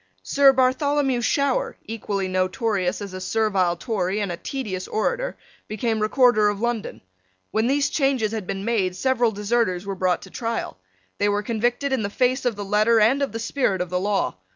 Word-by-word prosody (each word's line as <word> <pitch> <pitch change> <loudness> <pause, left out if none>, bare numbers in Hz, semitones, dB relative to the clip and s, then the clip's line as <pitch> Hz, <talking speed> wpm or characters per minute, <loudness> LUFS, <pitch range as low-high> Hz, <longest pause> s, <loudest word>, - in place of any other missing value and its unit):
Sir 280 -1 +5
Bartholomew 265 0 +1
Shower, 280 +3 0
equally 205 -3 -3
notorious 185 +1 -1
as 200 -2 -8
a 185 - -6
servile 195 -4 +1
Tory 200 -2 -2
and 200 -3 -2
a - - -3
tedious 200 -6 -4
orator, - - -1 0.3
became 220 +1 -1
Recorder 215 -1 +4
of 205 -1 -3
London. 235 -1 -3 0.5
When 220 +2 +1
these 280 +2 +2
changes 270 -7 +1
had 215 -5 -4
been 195 0 -4
made, 200 -6 0
several 245 0 +1
deserters 205 -3 0
were 200 - -3
brought 185 -1 0
to - - -12
trial. 230 - -4 0.4
They 205 - +2
were 205 0 0
convicted 240 +5 -1
in 260 - +1
the 200 - -2
face 255 +4 0
of 240 -3 +1
the 205 0 -5
letter 215 +3 +3
and 240 +7 +3
of 280 - 0
the 225 - -4
spirit 230 -4 0
of 180 -1 -3
the 180 - 0
law. 200 - -1
220 Hz, 185 wpm, -23 LUFS, 195-250 Hz, 0.5 s, Sir